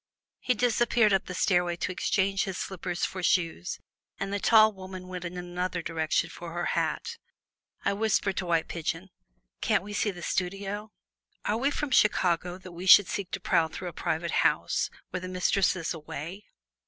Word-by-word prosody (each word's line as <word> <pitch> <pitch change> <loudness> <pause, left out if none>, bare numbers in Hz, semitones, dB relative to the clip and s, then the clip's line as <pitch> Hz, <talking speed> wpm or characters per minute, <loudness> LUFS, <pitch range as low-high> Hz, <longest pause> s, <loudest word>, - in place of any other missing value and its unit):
He 250 - +1
disappeared 235 -2 +3
up 190 - +2
the 180 - -5
stairway 175 -1 +2
to 175 - -2
exchange 195 +1 +1
his 190 -2 -4
slippers 180 -2 -3
for 185 - -5
shoes, 165 - 0 0.4
and 195 0 -3
the 200 - 0
tall 220 0 +6
woman 185 -1 -9
went 180 -1 -6
in 175 +1 -5
another 180 0 -3
direction 165 0 0
for 170 0 -8
her 175 0 -2
hat. - - -1 0.7
I 200 - +2
whispered 205 -2 +1
to 185 - -2
White 165 -1 +1
Pigeon, 165 +3 -4 0.5
"Can't - - +2
we 205 +1 -7
see 205 - +1
the 175 -3 -7
studio?" 195 +3 -2 0.6
"Are 210 - +1
we 270 +4 +2
from 290 -1 -3
Chicago, 180 -5 +3
that 185 -1 -11
we 175 +2 -7
should 200 +1 +9
seek 195 -2 -3
to 195 - -1
prowl 170 -2 +2
through 175 +3 -6
a - - -12
private 170 0 -2
house, - - +1 0.2
when 180 - -3
the 185 - -5
mistress 185 +1 +2
is 180 -1 -2
away? 165 +5 -7
185 Hz, 180 wpm, -28 LUFS, 175-200 Hz, 0.7 s, should